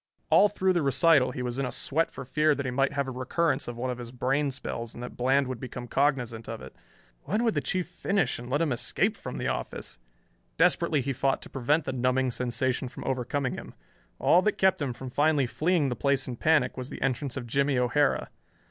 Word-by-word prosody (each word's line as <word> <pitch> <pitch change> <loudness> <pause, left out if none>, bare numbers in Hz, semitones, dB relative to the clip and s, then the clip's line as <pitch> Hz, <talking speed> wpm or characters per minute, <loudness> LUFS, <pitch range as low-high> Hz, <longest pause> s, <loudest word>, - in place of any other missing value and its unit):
All 210 - +7
through 190 -2 +1
the 175 - +1
recital 135 0 +4
he 125 0 -4
was 125 +1 -3
in 135 - 0
a - - -4
sweat 160 +4 0
for - - -8
fear 150 +3 +2
that 140 - -4
he 130 - -1
might 135 +2 +1
have 140 -1 -1
a - - -3
recurrence 135 +3 0
of 120 -1 -5
one 125 +1 -2
of 125 - -6
his 120 -1 -7
brain 135 +3 0
spells 120 -3 -5
and 120 - -7
that 125 - -7
Bland 135 +2 +2
would 130 -2 -4
become 125 -1 -7
cognizant 125 -5 0
of 115 -1 -5
it. 65 - -11 0.5
When 215 +5 0
would 225 -2 +2
the - - 0
Chief 185 -2 -2
finish 180 -5 -1
and 120 0 -8
let 145 +5 +1
him 155 - 0
escape 120 - 0
from - - -7
the - - -2
office? - - -4 0.6
Desperately 150 - +3
he 135 +1 -2
fought 135 +1 +1
to - - -12
prevent 145 +4 +1
the 130 - -2
numbing 130 +1 +1
sensation 125 +1 -1
from - - -9
overcoming 130 +1 -1
him. - - -8 0.4
All 180 - +5
that 215 +2 0
kept 190 -4 +3
him 140 -3 -1
from 125 +1 -8
finally 145 0 +3
fleeing 155 +3 +1
the 125 - -2
place 140 -1 +1
in 125 - -4
panic 150 -1 +2
was 130 +1 -5
the - - -7
entrance 135 0 -1
of 125 - -4
Jimmie 140 +3 +1
O'Hara. 125 +4 +1
135 Hz, 230 wpm, -28 LUFS, 125-145 Hz, 0.6 s, All